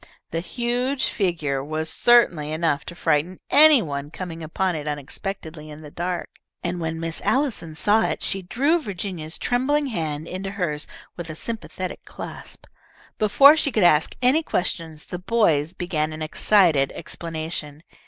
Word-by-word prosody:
The 165 Hz, -, -1 dB
huge 245 Hz, +7 st, -1 dB
figure 155 Hz, -9 st, -1 dB
was 155 Hz, +2 st, -3 dB
certainly 165 Hz, -5 st, +3 dB
enough 155 Hz, -3 st, 0 dB
to 175 Hz, -, -8 dB
frighten 165 Hz, +2 st, 0 dB
any 295 Hz, -4 st, +8 dB
one 140 Hz, -1 st, -4 dB
coming 165 Hz, 0 st, -7 dB
upon 175 Hz, +3 st, -1 dB
it 150 Hz, -1 st, -5 dB
unexpectedly 155 Hz, +2 st, -5 dB
in 150 Hz, +1 st, -10 dB
the 150 Hz, -2 st, -11 dB
dark, 175 Hz, +2 st, -3 dB, 0.4 s
and 175 Hz, 0 st, -2 dB
when 160 Hz, -1 st, -3 dB
Miss 165 Hz, 0 st, -3 dB
Allison 245 Hz, -, 0 dB
saw 210 Hz, +6 st, +3 dB
it -, -, -3 dB
she 195 Hz, -, -1 dB
drew 280 Hz, -, +1 dB
Virginia's 180 Hz, -, -5 dB
trembling 275 Hz, +4 st, +1 dB
hand 160 Hz, -, -3 dB
into 190 Hz, +2 st, -5 dB
hers 175 Hz, -7 st, -3 dB, 0.3 s
with 170 Hz, -2 st, -7 dB
a 155 Hz, -, -6 dB
sympathetic 185 Hz, -2 st, -5 dB
clasp. -, -, -10 dB, 0.5 s
Before 275 Hz, +8 st, +7 dB
she 295 Hz, -3 st, 0 dB
could 215 Hz, -5 st, +2 dB
ask 160 Hz, -3 st, +4 dB
any 265 Hz, +6 st, +4 dB
questions, 165 Hz, -, -3 dB
the 180 Hz, -, -6 dB
boys 180 Hz, -7 st, +2 dB
began 160 Hz, -4 st, -2 dB
an 155 Hz, 0 st, -5 dB
excited 160 Hz, -4 st, +3 dB
explanation. 160 Hz, -2 st, -5 dB
175 Hz, 155 wpm, -23 LUFS, 155-215 Hz, 0.5 s, any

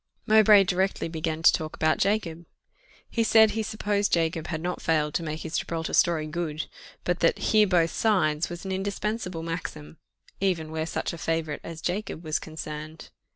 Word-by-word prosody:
Mowbray 215 Hz, -2 st, +7 dB
directly 190 Hz, 0 st, 0 dB
began 160 Hz, 0 st, -3 dB
to -, -, +7 dB
talk 155 Hz, -1 st, -3 dB
about 155 Hz, 0 st, +1 dB
Jacob. 175 Hz, -5 st, -1 dB, 0.6 s
He 230 Hz, -, 0 dB
said 220 Hz, -1 st, +6 dB
he 220 Hz, -, -2 dB
supposed 205 Hz, -1 st, -1 dB
Jacob 165 Hz, -1 st, 0 dB
had 160 Hz, -2 st, -3 dB
not 175 Hz, +2 st, -3 dB
failed 150 Hz, -2 st, +1 dB
to -, -, 0 dB
make 155 Hz, -1 st, -4 dB
his 160 Hz, -, -2 dB
Gibraltar 165 Hz, -1 st, -4 dB
story 165 Hz, -3 st, +3 dB
good; 155 Hz, -1 st, -3 dB, 0.4 s
but 175 Hz, 0 st, 0 dB
that 165 Hz, -, +3 dB
"Hear 215 Hz, -1 st, +3 dB
both 170 Hz, -3 st, +3 dB
sides" 160 Hz, -8 st, +1 dB
was 175 Hz, +2 st, -7 dB
an 190 Hz, -, -3 dB
indispensable 195 Hz, -2 st, -3 dB
maxim, 165 Hz, -2 st, -6 dB, 0.4 s
even 170 Hz, -5 st, 0 dB
where 160 Hz, 0 st, -2 dB
such -, -, -3 dB
a 170 Hz, -, -8 dB
favourite 160 Hz, -2 st, -2 dB
as 165 Hz, -1 st, -8 dB
Jacob 180 Hz, -2 st, -3 dB
was 155 Hz, -1 st, -1 dB
concerned. 155 Hz, 0 st, -8 dB
165 Hz, 175 wpm, -26 LUFS, 160-195 Hz, 0.6 s, Mowbray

